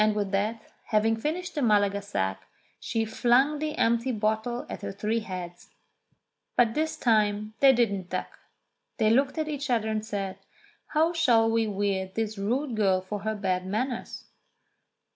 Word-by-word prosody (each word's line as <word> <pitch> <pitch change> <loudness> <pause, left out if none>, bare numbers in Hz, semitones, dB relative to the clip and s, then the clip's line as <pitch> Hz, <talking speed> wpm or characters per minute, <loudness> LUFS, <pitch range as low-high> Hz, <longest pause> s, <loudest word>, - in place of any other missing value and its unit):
And 215 0 +2
with 205 -2 -1
that, 210 +3 0 0.3
having 220 +1 +2
finished 315 +10 -3
the 295 - -2
Malaga 205 -4 +3
sack, 95 - -3 0.3
she 225 -1 -1
flung 245 +6 +2
the 305 0 -3
empty 235 +3 +2
bottle 220 +2 -1
at - - -6
the - - -5
three 215 +3 -1
heads. 180 -4 -7 0.9
But 235 -2 +4
this 315 +3 -1
time 215 -2 +1
they 275 -1 +7
didn't 200 -7 0
duck. - - -5 0.6
They 220 -2 +3
looked 270 +5 +2
at 310 -1 -1
each 290 -2 -4
other 225 -3 +1
and 215 -1 -1
said, 195 -3 -4 0.5
"How 320 +2 +2
shall 235 -9 +4
we 225 -1 +2
weird 195 -2 -2
this 220 -2 -2
rude 245 +5 -1
girl 195 -3 +3
for 205 +3 -5
her 220 +2 -2
bad 185 -3 -1
manners 240 +5 -3
220 Hz, 160 wpm, -27 LUFS, 200-245 Hz, 0.9 s, they